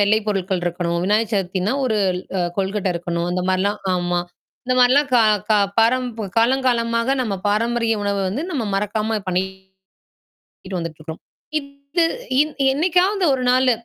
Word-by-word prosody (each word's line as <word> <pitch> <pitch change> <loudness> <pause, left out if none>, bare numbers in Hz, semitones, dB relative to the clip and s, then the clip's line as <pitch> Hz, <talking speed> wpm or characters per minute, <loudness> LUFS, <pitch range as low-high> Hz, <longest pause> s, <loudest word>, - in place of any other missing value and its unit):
வெள்ளை 205 +2 +4
பொருட்கள் 190 -2 -1
இருக்கணும். 170 0 -1
விநாயகர் 215 +3 +1
சதுர்த்தினா, 190 +1 0
ஒரு 220 -4 +1 0.4
அ - - +1 0.2
கொழுக்கட்ட 195 0 -1
இருக்கணும். 170 0 -2
அந்த 180 0 -1
மாரில்லாம் 200 +3 0
ஆமா. 175 -1 0 0.5
இந்த 255 - +1
மாரில்லாம் 265 +4 +4
க - - +7 0.3
க - - +3 0.3
பாரம் 250 +3 +3 0.3
காலம் 255 +4 +3
காலமாக 230 0 +1
நம்ம 215 -5 -2
பாரம்பரிய 230 +1 +1
உணவ 200 0 0
வந்து, 265 - -3
நம்ம 280 -9 -2
மறக்காம 215 +2 -1
பண்ணிட்டு 190 +1 -5 0.8
வந்துட்டு 165 -2 -6
இருக்குறோம். 160 +1 -8 0.4
இது 280 +4 -3 0.4
இன் 305 0 -1 0.2
என்னைக்காவது 365 +5 +2
1 255 - -4
நாலு 255 0 +4
215 Hz, 145 wpm, -21 LUFS, 190-255 Hz, 0.8 s, க